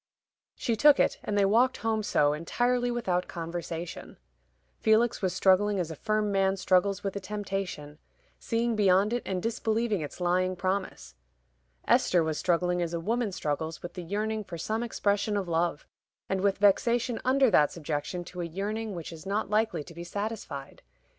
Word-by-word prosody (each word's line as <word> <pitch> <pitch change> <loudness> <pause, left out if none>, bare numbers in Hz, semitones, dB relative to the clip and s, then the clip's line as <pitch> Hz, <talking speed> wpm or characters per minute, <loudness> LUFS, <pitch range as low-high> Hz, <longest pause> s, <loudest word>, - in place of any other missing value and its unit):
She 235 - -1
took 290 +4 +6
it, - - +2
and 205 - -2
they 200 - +4
walked 235 +6 +3
home 220 -1 +1
so, 145 -8 +2
entirely 245 +10 0
without 190 -7 -1
conversation. 170 0 -6 0.6
Felix 220 +2 +3
was 185 -2 +1
struggling 190 +2 +3
as 170 -2 -2
a - - -6
firm 215 +4 0
man 195 0 +2
struggles 190 +1 +2
with 195 -1 -3
a - - -2
temptation, 190 -7 -5 0.4
seeing 230 0 0
beyond 200 +1 +3
it 240 - 0
and 185 -2 -2
disbelieving 225 -3 0
its 150 - -7
lying 185 +1 +1
promise. 190 +1 -3 0.7
Esther 175 -2 +4
was 160 -1 -2
struggling 180 0 +1
as 170 0 -2
a - - -2
woman 225 +4 -1
struggles 160 -1 -3
with 175 - -7
the 180 - -6
yearning 215 +5 -2
for 175 -4 -8
some 215 +7 -2
expression 205 -2 0
of 195 -3 -2
love, 165 -2 0 0.4
and 190 -1 -1
with 200 0 +2
vexation 235 +4 +2
under 260 -1 +4
that 150 -5 +4
subjection 160 +2 -4
to 180 +1 -7
a - - -2
yearning 205 +5 -4
which 170 -1 -6
is 165 +3 -10
not 205 +1 -1
likely 210 -7 +1
to 170 - -13
be 170 +1 -7
satisfied. 185 -7 -5
195 Hz, 175 wpm, -28 LUFS, 175-220 Hz, 0.7 s, took